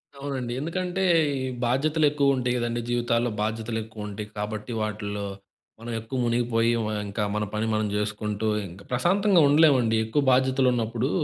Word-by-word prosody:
అవునండి. 135 -3 -4
ఎందుకంటే 180 +5 -2 0.3
ఈ - - -3 0.3
బాధ్యతలు 150 +6 +2
ఎక్కువుంటాయి 140 -4 +1
గదండీ 120 0 -1
జీవితాల్లో. 120 0 +1
బాధ్యతలు 110 +1 -2
ఎక్కువుంటాయి 105 -1 -7
కాబట్టి 105 +2 -4
వాటిల్లో 105 -1 -3 0.5
మనం 120 +1 -7
ఎక్కువ 115 +4 -5
మునిగిపోయి 115 -1 +1
వ - - -2 0.2
ఇంకా 100 +2 -2
మన 105 0 0
పని 105 +1 -1
మనం 110 0 +1
చేసుకుంటింకా, 105 -2 -2
ప్రశాంతంగా 185 +7 +3
ఉండలేమండి 140 -6 +4
ఎక్కువ 110 +7 0
బాధ్యతలున్నప్పుడు, 125 -2 +2
120 Hz, 130 wpm, -26 LUFS, 110-135 Hz, 0.5 s, ఉండలేమండి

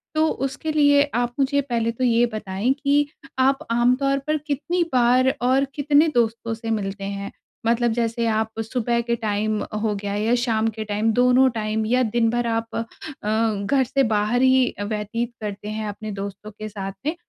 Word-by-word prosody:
तो 315 +1 +3 0.2
उसके 290 +4 -3
लिए 285 -2 +5
आप 240 0 0
मुझे 280 +1 +2
पहले 235 -4 -1
तो 245 +3 -4
ये 235 -1 +4
बताएँ 205 +3 -1
कि 285 0 +3 0.3
आप 270 +1 +2
आमतौर 255 +4 +2
पर 305 0 +2
कितनी 340 +5 0
बार 255 +1 +4
और 260 +3 +3
कितने 290 +2 +4
दोस्तों 230 -1 0
से 225 0 -6
मिलते 200 -2 -3
हैं? 200 0 -4 0.3
मतलब 235 +1 +2
जैसे 230 0 -1
आप 220 0 -1
सुबह 235 +1 -1
के 235 0 -1
टाइम 215 -1 -1 0.2
हो 220 -2 0
गया 200 0 -4
या 220 +3 +1
शाम 225 -2 +1
के 220 - -2
टाइम 210 +2 0
दोनों 250 +2 +5
टाइम 220 -2 -2
या 250 +3 +2
दिन 230 0 +1
भर 240 +1 0
आप 225 0 -2
अ, 230 - -1 0.8
घर 270 +4 +3
से 270 +2 +1
बाहर 220 +1 +1
ही 260 -1 +5
अ, - - -2
व्यतीत 215 +3 -3
करते 205 0 -5
हैं 215 0 -3
अपने 215 +1 -6
दोस्तों 200 +1 -6
के 215 +1 -7
साथ 195 -2 -5
में? 310 +3 0
230 Hz, 185 wpm, -23 LUFS, 215-260 Hz, 0.8 s, लिए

